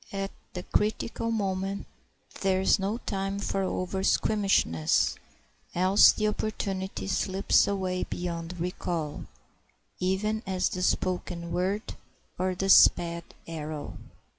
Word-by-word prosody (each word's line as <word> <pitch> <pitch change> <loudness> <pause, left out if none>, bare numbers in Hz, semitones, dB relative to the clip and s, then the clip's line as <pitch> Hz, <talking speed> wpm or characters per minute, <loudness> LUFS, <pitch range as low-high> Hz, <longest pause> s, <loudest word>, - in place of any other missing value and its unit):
At 195 0 -3 0.2
the 180 - -5
critical 220 +3 -1
moment 195 -2 -2 0.5
there 190 -1 +2
is 190 - +3
no 200 +4 -1
time 195 -3 -3
for 200 -1 -1
over 185 0 -2
squeamishness; 195 - +2 0.6
else 185 +3 +7
the 215 - -1
opportunity 195 -3 -3
slips 195 0 +2
away 185 -2 -1
beyond 175 0 -5
recall, 170 -3 -3 0.7
even 200 +4 0
as 185 -1 +1
the 180 - -4
spoken 180 -2 -1
word 190 +5 -1 0.5
or 185 0 0
the 195 +2 -2
sped 170 -3 +5 0.2
arrow. 155 -2 -6
190 Hz, 115 wpm, -28 LUFS, 180-195 Hz, 0.7 s, else